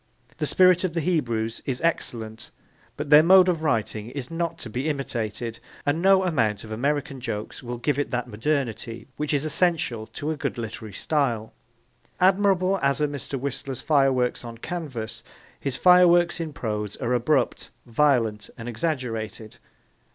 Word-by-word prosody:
The 150 -1 -1
spirit 185 +1 +5
of 180 -3 -2
the - - +1
Hebrews 120 -10 -1
is 130 -2 -1
excellent 115 -9 -2 0.5
but 150 0 -5
their 150 +1 +10
mode 185 +2 +7
of 170 -3 +1
writing 110 -6 -1
is 130 +1 -6
not 165 0 -2
to 125 - -7
be 130 +7 -2
imitated, 115 -5 -3 0.3
and 145 +3 +1
no 190 0 +5
amount 110 - 0
of 110 - -10
American 140 +3 -1
jokes 110 -4 -5
will 120 -1 -5
give 140 +4 0
it 145 - -1
that 125 -1 -2
modernity 120 -1 -2
which 150 -1 -2
is 145 0 +1
essential 155 -9 +1
to 150 +2 -4
a - - -2
good 140 -3 -3
literary 110 -1 -6
style. 120 - -1 0.7
Admirable 190 0 +3
as 140 +1 +2
are 150 - +2
Mr. 140 -1 -5
Whistler's 135 0 -4
fireworks 135 -5 +2
on 115 -1 -8
canvas, 130 -7 -5 0.4
his 135 -2 -3
fireworks 175 -1 +5
in 165 -2 -3
prose 105 -6 -3
are 125 0 -2
abrupt, 125 +1 +1 0.2
violent 115 -5 +1
and 115 -1 -7
exaggerated. 115 -5 -3
135 Hz, 160 wpm, -25 LUFS, 115-160 Hz, 0.7 s, their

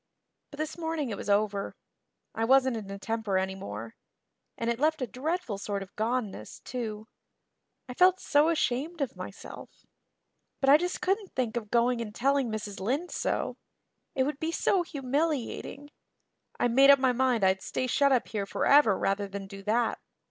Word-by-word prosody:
But 285 - -12
this 310 +2 -4
morning 320 -6 -2
it - - -2
was 200 - -6
over. 200 -1 +1 0.6
I 225 - -2
wasn't 260 +1 +4
in 210 -3 -6
a 200 - -5
temper 220 -1 -1
anymore 115 - -4 0.6
and 230 - -3
it 235 0 0
left 310 -1 +1
a - - +1
dreadful 255 - -3
sort 200 -1 -3
of 195 - -17
goneness, 220 - -3
too. 220 -3 -5 0.8
I 250 - -6
felt 365 +6 +5
so 295 +2 +3
ashamed 310 +1 -1
of 275 - -2
myself. - - -10 0.7
But 270 0 +4
I 290 - +9
just 355 +3 -3
couldn't 390 +2 -1
think 245 -3 -1
of 220 -3 -4
going 240 +1 +2
and 210 -2 -6
telling 275 -1 +2
Mrs. 210 -2 -5
Lynde 270 - -1
so. - - -2 0.6
It 265 - +3
would 290 +1 -3
be 320 +1 -1
so 370 +2 +2
humiliating. 290 -2 -2 0.7
I - - +3
made 270 +4 +5
up 280 - +9
my 260 -1 +3
mind 250 -3 +1
I'd 190 0 +3
stay 255 - -2
shut 280 +2 +3
up 255 -3 +2
here 205 -3 -3
forever 275 -3 +4
rather 200 +1 0
than 195 0 -6
do 195 0 -10
that. 225 +4 0
245 Hz, 175 wpm, -29 LUFS, 210-285 Hz, 0.8 s, I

